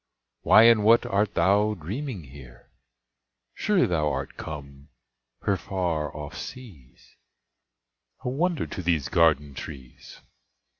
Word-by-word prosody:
Why 110 - +7
and 115 -2 +6
what 115 +2 +5
art 100 +1 0
thou 100 +5 +3
dreaming 105 - -6
here? 65 -3 -15 0.8
Sure 205 -4 +2
thou 75 -4 0
art 70 0 -5
come 70 -1 -9 0.6
o'er 100 - +2
far 85 -7 -2
off 75 -1 -7
seas, 95 - -11 1.0
A - - -3
wonder 165 +5 -1
to - - -6
these 80 -6 0
garden 75 -4 +2
trees! 65 -3 -10
85 Hz, 115 wpm, -25 LUFS, 70-105 Hz, 1.0 s, Why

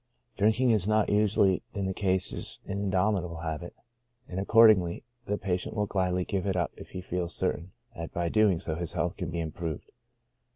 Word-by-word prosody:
Drinking 110 +4 +3
is 105 -4 +1
not 110 0 +3
usually 105 -2 +3
in 100 -2 -1
these 95 - -1
cases 95 -1 -2
an 100 0 -3
in - - 0
domitable 90 -3 0
habit, 80 +2 -5 0.5
and 90 - -4
accordingly, 100 -4 +5 0.2
the 105 - 0
patient 95 0 -2
will 105 -1 +1
gladly 90 -2 0
give 100 0 -2
it 95 - 0
up 85 -2 0
if - - -11
he 90 - -6
feels 90 -2 -3
certain 85 +4 -2 0.2
that 85 0 -6
by 85 - -2
so - - 0
doing 105 -6 +4
his 80 +1 -2
health 85 +1 -1
can 90 -4 -4
be 85 - -3
improved. 80 -1 -5
95 Hz, 190 wpm, -29 LUFS, 85-100 Hz, 0.5 s, accordingly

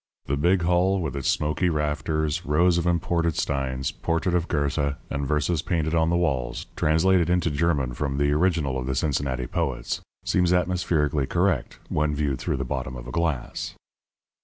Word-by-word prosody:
The 70 - 0
big 85 +5 +2
hall 90 +3 +3
with 80 -6 -3
its 70 -2 -1
smoky 75 +4 +1
rafters, 75 0 -1
rows 85 +4 +3
of 85 - -1
imported 85 -1 +1
steins, 65 -1 -1
portrait 85 +2 -1
of 85 -1 +1
Goethe, 70 -1 0 0.2
and 70 0 -2
verses 75 +2 +1
painted 80 -2 -1
on 80 -1 +3
the 85 - +2
walls 70 -8 -1
translated 85 +3 +3
into 90 -2 +2
German 70 -4 +1
from 70 +1 -2
the 70 0 +2
original 75 -4 +1
of 65 - -4
the 65 - -1
Cincinnati 65 -3 -1
poets 65 -5 -2 0.2
seems 90 -1 +2
atmospherically 85 -6 +1
correct 90 -3 0
when 75 0 0
viewed 70 -3 -1
through - - -1
the 65 - -2
bottom 65 +1 -4
of - - -8
a - - -6
glass. 80 -6 -2
75 Hz, 170 wpm, -25 LUFS, 70-85 Hz, 0.2 s, hall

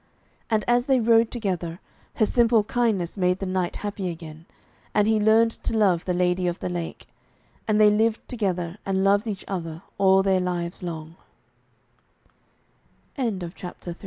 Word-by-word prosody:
And 220 -2 +1
as 240 +2 +2
they 265 -2 +4
rode 230 0 +4
together, 180 -7 -3 0.4
her 215 - +3
simple 230 -1 +3
kindness 210 -6 -1
made 180 0 +2
the 195 - -4
knight 185 -1 -1
happy 200 -3 -4
again, 165 -1 -9 0.5
and 210 0 +3
he 220 -1 +3
learned 220 +2 +4
to 225 - -3
love 185 -6 +2
the 180 - 0
Lady 180 0 +1
of 175 0 -1
the - - -4
Lake, 175 -2 -5 0.6
and 215 -1 +2
they 210 -1 +7
lived 220 +1 +1
together 185 -5 -2
and 190 -1 0
loved 200 +3 +3
each 200 -3 -5
other 165 -3 -5 0.2
all 190 0 +5
their 190 -1 +2
li 175 -2 -2
195 Hz, 145 wpm, -24 LUFS, 180-220 Hz, 0.6 s, they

